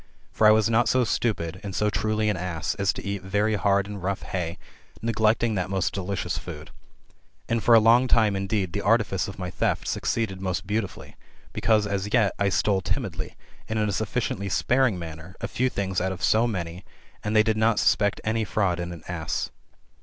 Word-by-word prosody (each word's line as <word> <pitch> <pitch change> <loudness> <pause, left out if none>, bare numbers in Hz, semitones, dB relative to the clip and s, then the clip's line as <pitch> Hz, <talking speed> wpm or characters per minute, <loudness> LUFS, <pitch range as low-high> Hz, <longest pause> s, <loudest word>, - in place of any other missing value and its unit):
For 110 - +4
I - - +8
was 110 0 +4
not 115 +1 +3
so 130 -1 +3
stupid, 90 -7 -1
and 100 -3 -6
so 105 0 +1
truly 110 0 0
an 105 - +1
ass, 85 -4 -2
as 100 -2 +1
to - - -8
eat 100 -1 -3
very 105 +3 0
hard 100 -1 +2
and 100 -1 -7
rough 95 +2 -2
hay, 85 -2 -3 0.4
neglecting 110 0 +1
that 90 -2 -2
most 95 -2 0
delicious 100 0 -3
food. - - -9 0.8
And 115 -1 0
for 120 - +6
a - - +9
long 115 +4 +5
time, 110 -4 +3
indeed, 95 -2 -1
the 100 - -1
artifice 100 -3 +2
of 100 - -8
my 90 -2 -4
theft - - -1
succeeded 95 -5 -1
most 95 -2 -2
beautifully, 105 -1 -4 0.4
because, 110 -2 +2
as 100 0 -2
yet, 110 -5 +3
I 100 0 +2
stole 95 +1 +1
timidly, 90 - -3 0.3
and 110 - -1
in 105 -1 +1
a - - 0
sufficiently 100 -1 -2
sparing 125 +2 +2
manner, 80 +1 -8
a - - -3
few 130 +1 0
things 95 -5 -2
out 95 +1 0
of 90 -2 -7
so 110 +5 +4
many, 90 -4 -4 0.4
and 105 +1 -1
they 110 - +6
did 110 -1 +1
not 110 0 +2
suspect 100 -1 +2
any 110 +1 0
fiaud 100 -4 0
in 85 0 -4
an 85 -3 -9
ass. 85 -3 -3
100 Hz, 200 wpm, -25 LUFS, 95-110 Hz, 0.8 s, a